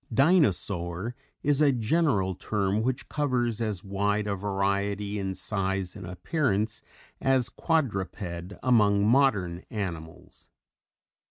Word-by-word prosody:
"Dinosaur" 110 - +2 0.3
is 145 0 +3
a 145 -2 +6
general 120 - +1
term 100 +2 -1
which 125 +2 -2
covers 125 -6 0
as 105 -5 -2
wide 100 +1 0
a 105 - -1
variety 100 +1 -1
in 95 -1 -3
size 95 -3 -2
and 95 -4 -8
appearance 110 - -1 0.4
as 130 -2 +2
"Quadruped" 100 - -2
among 105 -5 +4
modern 105 -9 +3
animals. 85 -8 -7
105 Hz, 105 wpm, -27 LUFS, 95-125 Hz, 0.4 s, a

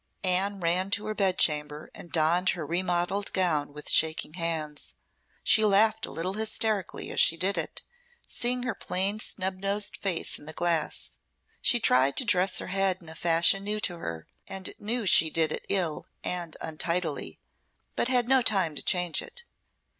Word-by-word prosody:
Anne 195 +2 +1
ran 180 +2 0
to 205 +1 0
her 215 - -3
bed 195 -3 +1
chamber 150 -1 +1
and 170 - -10
donned 170 +3 +2
her 170 -4 -2
remodelled 180 +4 -1
gown 155 -6 0
with 150 +1 -10
shaking 155 -1 +3
hands. 160 -3 -3 0.5
She 220 - +4
laughed 215 +2 +3
a - - -10
little 180 +3 -3
hysterically 215 -2 -2
as - - -2
she 165 - +5
did 195 +3 0
it, - - -2 0.4
seeing 245 0 -1
her 250 - -2
plain 195 +3 -2
snub 190 -3 -3
nosed 200 +1 -1
face 190 -4 -2
in 150 - -14
the 155 - -6
glass. 165 -2 0 0.4
She 240 - +4
tried 135 - +3
to 260 - +5
dress 185 -2 +2
her - - -4
head 195 -1 +2
in 160 - -12
a - - -9
fashion 170 +4 +2
new 210 +1 -2
to 175 -3 0
her, 80 - -6 0.2
and 190 -1 -5
knew 230 +2 -2
she 165 -3 +6
did 160 -1 +2
it - - -4
ill 175 -6 -1 0.2
and 175 -3 -2
untidily, 160 - -2 0.6
but - - 0
had 250 -2 +2
no 265 0 +4
time 195 -8 +1
to 145 - -7
change 180 -3 +1
it. 475 - -8
180 Hz, 175 wpm, -27 LUFS, 160-200 Hz, 0.6 s, she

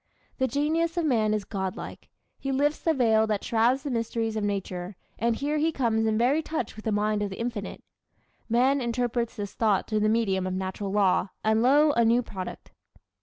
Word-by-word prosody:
The 260 - +2
genius 320 +5 0
of 340 - +1
man 225 -7 +2
is 210 -2 -1
God 190 -3 -3
like. - - -9 0.3
He 270 - -3
lifts 290 +3 +1
the 325 - +1
veil 220 -4 +3
that 210 -2 -1
shrouds 240 +4 +2
the 285 - -3
mysteries 230 -1 -2
of 215 - -1
nature, 195 -2 -3 0.2
and 235 0 +1
here 295 +4 -1
he 320 +2 +2
comes 225 -6 +1
in 215 0 +1
very 260 +7 +3
touch 305 -8 -4
with 215 - -11
the 220 - 0
mind 210 0 +1
of 205 - -1
the 190 - -8
Infinite. 230 -4 -4 0.7
Man 260 +4 +3
interprets 235 -1 -1
this 205 -3 -5
thought 215 -4 +1
through 215 -1 0
the 215 0 +2
medium 195 -5 +1
of 185 - -2
natural 190 +1 -4
law, 195 -2 +2
and 220 +1 +2
lo, 290 +5 +5
a 235 -4 +2
new 235 +2 +3
product! 190 -4 -8
225 Hz, 205 wpm, -27 LUFS, 210-260 Hz, 0.7 s, lo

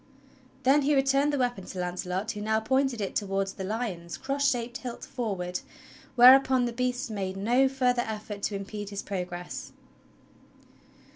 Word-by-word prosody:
Then 275 +3 +5
he 290 +1 +2
returned 275 +2 +3
the 290 - 0
weapon 245 -6 -1
to 185 - -7
Launcelot 180 +3 -2
who 210 - -6
now 220 +1 +1
pointed 260 +1 +1
it 195 - -3
towards 195 -1 -1
the 190 - -6
lions 190 -5 -4
cross 280 +1 +1
shaped 240 -1 -2
hilt 245 -2 -7
forward, 190 -8 -3 0.6
whereupon 260 0 +7
the 240 - -3
beasts 250 0 -2
made 190 -2 -3
no 245 +7 +3
further 250 -2 +1
effort 210 -1 -6
to 205 - -2
impede 200 +1 -5
his 200 -1 -5
progress. 180 -2 -5
225 Hz, 155 wpm, -28 LUFS, 195-255 Hz, 0.6 s, whereupon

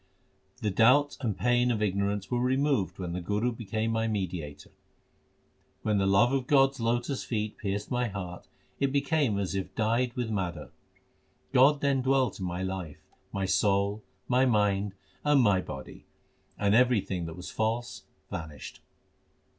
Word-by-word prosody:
The 105 - +1
doubt 130 +8 +4
and 110 -6 -1
pain 120 0 +2
of 115 -3 0
ignorance 100 +1 -1
were 120 0 +1
removed 130 -4 +1
when 90 -2 -4
the 90 - -3
Guru 105 +7 0
became 115 -1 -2
my 115 0 0
mediator. 90 -8 -4 1.1
When 105 -2 +1
the 95 - +2
love 100 +6 +4
of 130 -2 0
God 135 -2 +5
s 135 - -14
lotus 120 +4 -1
feet 110 -2 -3
pierced 100 0 -3
my 125 -1 +1
heart, 90 -4 -7 0.3
it 140 -1 +1
became 140 -5 +1
as 100 -2 -2
if 95 -1 -4
dyed 115 +2 +1
with 120 -3 -2
madder. 95 -5 -3 0.8
God 140 +3 +5
then 140 -2 +2
dwelt 130 -2 +1
in 95 - -3
my 90 +1 -3
life, 95 -5 -5 0.3
my 95 0 -2
soul, 100 +2 +1 0.3
my 130 +1 +3
mind, 105 -4 +1 0.3
and 145 -1 +4
my 100 -7 +4
body; 65 -6 -9 0.5
and 100 0 +2
everything 110 -8 +2
that 80 - -7
was 90 - -7
false 115 +2 -2 0.3
vanished. 75 -3 -7
110 Hz, 155 wpm, -29 LUFS, 95-125 Hz, 1.1 s, God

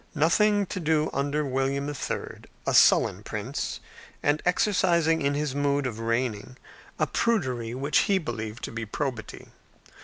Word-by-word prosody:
Nothing 205 +7 +3
to 185 - -5
do 155 -2 +1
under 145 +2 0
William 135 +1 -1
III., 145 -2 -4 0.2
a - - 0
sullen - - +5
prince, - - -4 0.4
and 145 +1 +2
exercising 175 -4 +2
in 140 0 +1
his 145 -2 -1
mode 145 0 0
of 115 -3 -4
reigning 115 0 -2 0.4
a - - +2
prudery 130 - -1
which 140 +3 +2
he 195 - +4
believed 110 - -5
to - - -4
be 115 0 -4
probity. 120 +1 -5
145 Hz, 145 wpm, -26 LUFS, 125-160 Hz, 0.4 s, sullen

